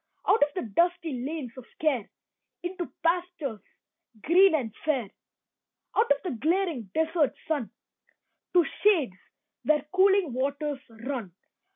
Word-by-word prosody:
Out 425 - +4
of 290 0 +4
the 365 - -2
dusty 335 - +1
lanes 285 -3 -4
of 255 - -9
care 275 -9 +1 0.5
Into 355 0 -4
pastures 335 -8 0 0.6
green 365 +2 +6
and 235 -8 -2
fair. 265 -10 0 0.8
Out 445 - +3
of 285 0 +2
the 360 - -2
glaring 325 - 0
desert 320 -2 +2
sun 290 -8 -1 0.8
To 350 -2 +5 0.2
shades 335 - +4 0.5
where 300 -2 +2
cooling 380 -5 +4
waters 280 +2 -1
run. 225 -5 -6
310 Hz, 125 wpm, -28 LUFS, 260-350 Hz, 0.8 s, green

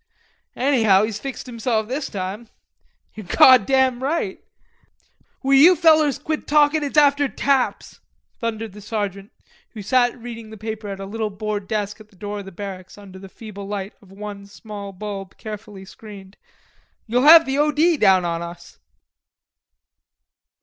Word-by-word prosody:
"Anyhow 225 -7 +3
he's 215 -1 -3
fixed 270 +2 -7
himself 230 -3 -2
this 270 +4 -4
time." 200 +3 -5 0.7
"You're 215 -4 -10
goddam 260 +3 +5
right." 270 - -2 1.0
"Will 270 +1 +2
you 315 +7 +7
fellers 310 -4 +4
quit 305 +2 -4
talkin'? 300 +1 +3
It's 290 +1 -4
after 285 -1 +4
taps," 270 -2 -1 0.4
thundered 225 -2 -4
the 210 +2 -12
sergeant, 205 -2 -4 0.4
who 215 -3 -8
sat 245 +3 +2
reading 230 -2 -9
the 220 - -11
paper 215 0 -6
at 195 -1 -6
a 195 - -6
little 220 +2 -3
board 205 0 -5
desk 210 0 -3
at 215 - -17
the 205 - -24
door 205 +2 -6
of 200 - -9
the 195 - -10
barracks 190 0 -9
under 195 -2 -12
the 195 0 -12
feeble 200 -1 -10
light 200 -1 -5
of 195 -2 -19
one 200 0 -9
small 205 -1 -9
bulb, 195 -1 -7
carefully 210 -2 -9
screened. 200 -1 -13 0.7
"You'll 240 +2 +1
have 320 +3 +8
the 270 +1 -1
O. 300 +1 +3
D. 325 +3 +3
down 190 - +4
on 170 -1 -2
us." 170 0 -10
215 Hz, 155 wpm, -21 LUFS, 200-265 Hz, 1.0 s, have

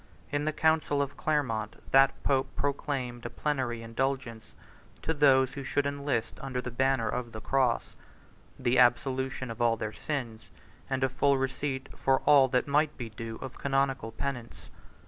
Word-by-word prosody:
In 145 0 0
the 155 - +1
council 160 -2 +2
of 140 -1 -1
Clermont, 115 -9 -1 0.2
that 135 0 +4
pope 135 -1 +1
proclaimed 135 -4 -2
a - - -7
plenary 130 -6 -2
indulgence 115 -1 -3 0.5
to 160 - 0
those 135 -3 +4
who 140 - -6
should 140 +2 0
enlist 140 -5 -2
under 130 -2 -3
the 125 0 -4
banner 130 -1 +1
of 120 +1 -3
the 110 - -6
cross; 130 +1 0 0.6
the 120 +1 +2
absolution 130 0 +2
of 115 - -7
all 115 -1 +3
their 110 0 -4
sins, 120 -7 -5 0.4
and 135 -1 0
a - - +4
full 140 +2 +2
receipt 135 0 -2
for 135 0 +2
all 140 -2 +6
that 125 +1 +1
might 150 +2 +2
be 120 -3 -5
due 115 +1 -6
of 130 -1 -8
canonical 135 -4 0
penance. 120 +1 -6
130 Hz, 165 wpm, -29 LUFS, 120-140 Hz, 0.6 s, all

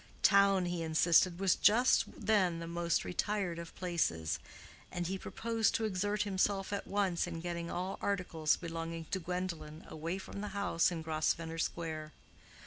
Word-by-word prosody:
Town, 200 -2 +5
he 175 -1 -2
insisted, 165 +2 +4
was 195 -2 +3
just 245 +4 +5
then 190 -6 +2
the 165 - -5
most 170 0 0
retired 185 -2 -1
of 170 -1 -9
places; 125 - -1 0.5
and 175 -1 -2
he 190 +3 -1
proposed 225 +3 0
to 225 - +1
exert 205 +1 0
himself 195 0 0
at 200 - -3
once 195 -4 +1
in 165 -2 -5
getting 170 0 -4
all 185 +2 -3
articles 175 -6 +1
belonging 165 -1 -5
to 190 - 0
Gwendolen 170 -3 -4
away 165 +4 -4
from 195 +1 -7
the 205 -1 -5
house 185 -4 +2
in 165 -3 -4
Grosvenor 160 +1 -1
Square. 155 -2 -3
175 Hz, 155 wpm, -33 LUFS, 165-195 Hz, 0.5 s, Town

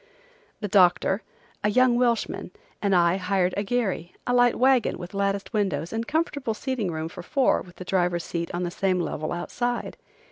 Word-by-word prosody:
The 205 - -1
doctor, 190 +1 +4 0.4
a 210 - +3
young 255 +2 +4
Welshman, 240 -2 0 0.3
and 200 -2 +2
I 175 +1 +4
hired 185 -1 +1
a 200 - 0
gharry, 200 -6 -2
a 245 - 0
light 245 -1 +4
wagon 260 -2 +3
with 175 +2 -8
latticed 200 +2 -1
windows 175 -6 -1
and 225 +1 -2
comfortable 290 -7 -1
seating 250 -6 -2
room 160 -1 -3
for 165 - -9
four 275 -3 +2
with 180 0 -13
the 185 - -9
driver's 180 -2 +1
seat 170 -1 -3
on 175 +1 -2
the 175 - -2
same 185 0 0
level 155 -2 -3
outside. 240 +7 -3
195 Hz, 180 wpm, -25 LUFS, 175-240 Hz, 0.4 s, doctor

